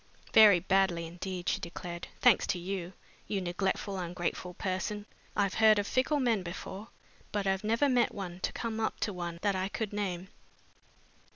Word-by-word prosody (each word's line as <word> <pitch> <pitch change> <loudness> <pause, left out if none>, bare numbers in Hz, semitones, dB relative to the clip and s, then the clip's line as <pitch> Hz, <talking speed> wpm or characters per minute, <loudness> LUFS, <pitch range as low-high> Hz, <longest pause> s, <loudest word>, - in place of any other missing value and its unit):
"Very 210 -5 +9
badly 180 -2 +2
indeed," 180 +2 -6
she - - +1
declared, 170 0 -6
"thanks 245 -4 +5
to 190 - 0
you, 180 0 -4 0.3
you 200 - -1
neglectful, 190 +2 -1
ungrateful 175 0 -3
person! 200 +2 -2 0.3
I've 200 -2 +1
heard 220 -1 +6
of 205 - +1
fickle 260 +7 +1
men 235 -6 +2
before 190 +4 -7 0.4
but 205 -1 -1
I've 190 0 +1
never 230 +6 +2
met 250 -3 +3
one 180 -3 -6
to - - -1
come 225 -2 -3
up 220 - -1
to 205 - 0
one 175 -2 -4
that 200 -2 +2
I 190 +1 -1
could 215 0 -3
name." 190 -3 -3
195 Hz, 170 wpm, -31 LUFS, 180-210 Hz, 0.4 s, Very